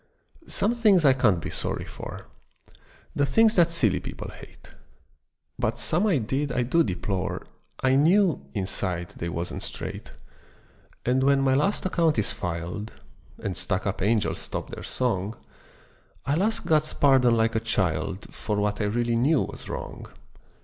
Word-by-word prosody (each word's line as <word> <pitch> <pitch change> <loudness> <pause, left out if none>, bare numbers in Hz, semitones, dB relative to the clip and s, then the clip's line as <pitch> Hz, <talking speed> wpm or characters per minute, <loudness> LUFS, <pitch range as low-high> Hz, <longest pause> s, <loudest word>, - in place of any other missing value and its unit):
Some 215 +4 +1
things 210 -8 +4
I 135 - +7
can't 110 -9 +3
be - - -5
sorry - - -3
for, - - -8 0.9
The 145 - +2
things 220 +10 +4
that 175 -5 +5
silly 125 - +2
people - - -7
hate: - - -14 0.9
But - - 0
some 180 +7 +1
I 185 -7 +3
did 135 +5 -1
I 125 0 +1
do 165 +8 +3
deplore, 95 -1 -3 0.4
I 130 0 +4
knew, 170 +5 +4
inside, 95 -3 -2
they 85 - -3
wasn't 85 +1 -4
straight. - - -7 0.9
And 125 +2 +2
when 140 0 +4
my 135 -1 +3
last 170 +11 +1
account 170 -5 +2
is 105 - 0
filed, 90 +4 -4 0.5
And 95 -3 -2
stuck 95 0 -2
up 100 -1 -2
angels 105 +2 +1
stop - - -5
their - - -7
song, 110 -4 -2 0.9
I'll 145 +6 +1
ask 225 +3 0
God's 155 -1 +2
pardon 130 -4 +4
like 115 0 +2
a 110 - +2
child 95 -3 -1
For 105 - -3
what 105 +1 0
I - - +1
really 120 +3 0
knew 135 +5 +3
was - - -9
wrong. - - -6
125 Hz, 155 wpm, -26 LUFS, 100-155 Hz, 0.9 s, I